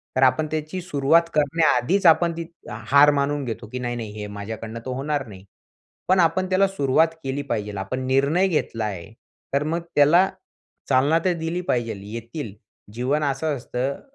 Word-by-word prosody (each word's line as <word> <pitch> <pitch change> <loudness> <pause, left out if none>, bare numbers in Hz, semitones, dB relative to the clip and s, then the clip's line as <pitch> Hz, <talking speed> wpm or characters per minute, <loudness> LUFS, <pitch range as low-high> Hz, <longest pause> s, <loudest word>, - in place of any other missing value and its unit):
तर 130 - +3
आपण 130 +4 +3
त्याची 155 +4 -3
सुरुवात 160 -1 +3
करण्याआधीच 155 +3 +2
आपण 170 +1 +5
ती 170 - -4 0.2
हार 135 +7 +4
मानून 145 0 0
घेतो 115 -1 -5
की, 125 - -4
नाही-नाही 120 -3 -4
हे 105 0 -6
माझ्याकडनं 110 +3 -7
तर - - -5
होणार 140 +2 -2
नाही. 95 -3 -12 0.7
पण 185 0 +4
आपण 185 +3 +2
त्याला 190 +1 +3
सुरुवात 160 -3 +2 0.2
केली 135 +2 -2
पाहिजे. 105 -6 -3
आपण 130 +7 -4
निर्णय 140 +8 +2
घेतला 115 -9 -1
आहे 100 -1 -6 0.4
तर 140 - +2
मग 165 +3 -1
त्याला 165 +6 +5 0.6
चालना 140 +5 +3
तर 185 - +3
दिली 165 +2 -2
पाहिजेल. 115 -5 -1
येतील, 115 +1 -6 0.4
जीवन 130 +6 0
असं 145 +2 -1
असतं, 130 +2 -3
140 Hz, 160 wpm, -23 LUFS, 120-160 Hz, 0.7 s, आपण